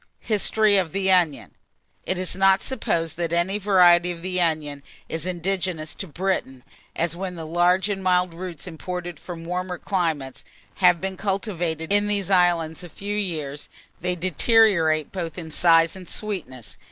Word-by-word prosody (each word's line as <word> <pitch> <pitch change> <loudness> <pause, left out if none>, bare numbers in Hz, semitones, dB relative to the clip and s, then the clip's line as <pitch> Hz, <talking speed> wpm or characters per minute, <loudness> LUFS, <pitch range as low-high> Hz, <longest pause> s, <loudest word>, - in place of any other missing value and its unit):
HISTORY 215 -1 +2
OF 180 -3 -3
THE 195 0 0
ONION. 150 - +2 0.6
It 185 - 0
is 185 0 -1
not 195 0 +4
supposed 165 - -2
that 170 -1 -2
any 175 +4 0
variety 180 -3 +5
of 170 -1 -9
the 185 -1 -1
onion 155 -4 -1 0.3
is 160 +2 -4
indigenous 180 -3 -2
to 195 - -7
Britain, 160 -7 -2 0.3
as 170 0 -1
when 185 0 -5
the 165 -1 -7
large 175 +3 +2
and 195 -2 -3
mild 180 -1 +2
roots 175 -2 -7
imported 175 -1 -6
from 165 -2 -8
warmer 180 +1 -3
climates, 160 -10 -2 0.3
have 180 -2 +5
been 190 0 -4
cultivated 180 -5 -2
in 205 0 +3
these 200 -2 -1
islands 175 -2 +2
a 175 - -9
few 200 +5 -5
years, 155 -8 -4 0.3
they 180 - -1
deteriorate 180 -3 +3
both 170 -3 -5
in 160 -3 -7
size 165 +1 +4
and 185 -2 -11
sweetness. 130 - -5
180 Hz, 160 wpm, -24 LUFS, 165-190 Hz, 0.6 s, variety